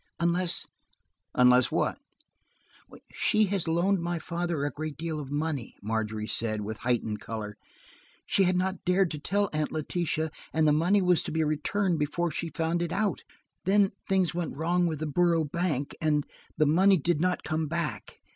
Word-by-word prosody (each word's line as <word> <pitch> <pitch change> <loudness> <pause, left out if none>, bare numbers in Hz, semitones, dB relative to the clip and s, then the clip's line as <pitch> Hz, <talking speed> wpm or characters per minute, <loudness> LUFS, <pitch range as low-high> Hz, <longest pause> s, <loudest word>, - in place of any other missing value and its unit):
Unless–" 170 +1 +1 0.7
"Unless 125 0 +5
what?" 165 - 0 1.1
"She 215 -1 +2
had 195 -3 -1
loaned 175 +4 +2
my 170 0 -2
father 170 -2 -2
a 145 - -1
great 155 -1 -5
deal 160 -1 -3
of 140 -3 -7
money," 145 -3 -3
Margery 110 0 -2
said, 110 -1 -1
with 105 +1 -5
heightened 115 -3 -1
color. 105 -1 -6 0.7
"She 195 - +3
had 180 0 +2
not 190 0 -1
dared 180 0 +2
to 150 - -4
tell 200 +6 0
Aunt 155 0 -1
Letitia, 160 0 -1 0.2
and 160 0 +3
the - - +5
money 180 +6 +3
was 180 -2 +4
to - - -5
be 160 0 +1
returned 165 +4 0
before 165 +3 -1
she 165 +3 -3
found 165 +1 -1
it 175 -1 -2
out. 205 -1 -1 0.4
Then–things 195 -2 +2
went 170 -5 -3
wrong 175 +3 +1
with 155 -2 -3
the - - 0
Borough 165 +1 +2
Bank, 150 -3 -2
and–the 155 0 -1
money 185 +6 +5
did 160 0 0
not 180 0 0
come 155 +1 -1
back. 165 0 -4
160 Hz, 165 wpm, -28 LUFS, 150-180 Hz, 1.1 s, Unless